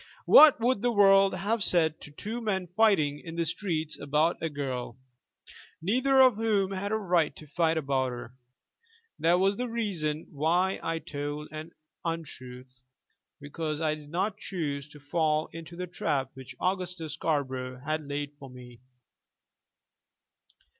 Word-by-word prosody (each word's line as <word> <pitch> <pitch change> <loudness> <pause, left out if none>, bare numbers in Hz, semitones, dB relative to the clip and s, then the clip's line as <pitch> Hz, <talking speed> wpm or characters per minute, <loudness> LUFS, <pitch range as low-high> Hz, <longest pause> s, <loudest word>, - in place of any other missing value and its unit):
What 305 -4 +9
would 235 -2 +1
the 245 - +2
world 195 -2 +5
have 205 +4 0
said 160 -4 +2
to - - -10
two 215 +11 -6
men 195 -5 -1
fighting 175 -10 +3
in 165 -1 -8
the 170 0 0
streets 160 -2 -2
about 150 +4 +1
a 165 - -1
girl, 130 -5 -4 0.8
neither 260 +9 +2
of 255 -5 +6
whom 210 -4 +1
had 195 +1 -3
a - - +2
right 175 -8 +1
to 155 - -11
fight 165 +2 +1
about 135 -3 0
her? 120 0 -8 0.9
That 170 +2 +3
was 195 +2 +2
the 250 - -2
reason 175 -10 -2
why 175 +6 +1
I 165 0 -2
told 145 -1 -5
an 155 +1 -7 0.3
untruth, 130 -6 -6 0.6
because 150 +1 -4
I 155 -2 +1
did 150 -1 -10
not 190 +5 -1
choose 145 -6 -4
to 150 - -14
fall 155 +1 0
into 165 +1 -9
the 180 +1 -4
trap 140 -6 -2
which 130 -1 -10
Augustus 180 -4 -2
Scarborough 130 -5 -2
had 155 -1 -2
laid 145 0 -3
for 135 - -10
me. 125 -1 -13
160 Hz, 150 wpm, -28 LUFS, 145-195 Hz, 0.9 s, What